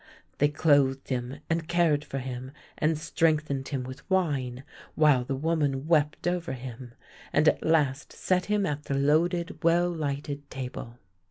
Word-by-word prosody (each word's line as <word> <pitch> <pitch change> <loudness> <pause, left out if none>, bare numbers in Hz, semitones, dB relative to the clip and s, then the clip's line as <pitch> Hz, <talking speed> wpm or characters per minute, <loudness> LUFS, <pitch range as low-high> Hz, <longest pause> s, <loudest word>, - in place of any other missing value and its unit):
They 145 - +5
clothed 140 -3 +2
him 125 0 -3
and 165 0 -1
cared 170 -4 +2
for 135 - -6
him, 130 0 -6 0.3
and 155 +1 +2
strengthened 155 -3 0
him 135 -3 -3
with 130 +7 -10
wine, 140 -9 0 0.3
while 150 -5 +4
the 135 +2 -3
v/oman 145 -3 0
wept 155 -1 +1
over 175 -5 -1
him, 125 -1 -8 0.4
and 150 +2 +3
at - - +3
last 150 -4 +1
set 180 -1 0
him 210 -1 +1
at 150 -3 -3
the 140 - -2
loaded, 170 +6 +1
well 175 +1 +3
lighted 145 -2 -4
table. 125 -2 -6
145 Hz, 155 wpm, -28 LUFS, 135-165 Hz, 0.4 s, They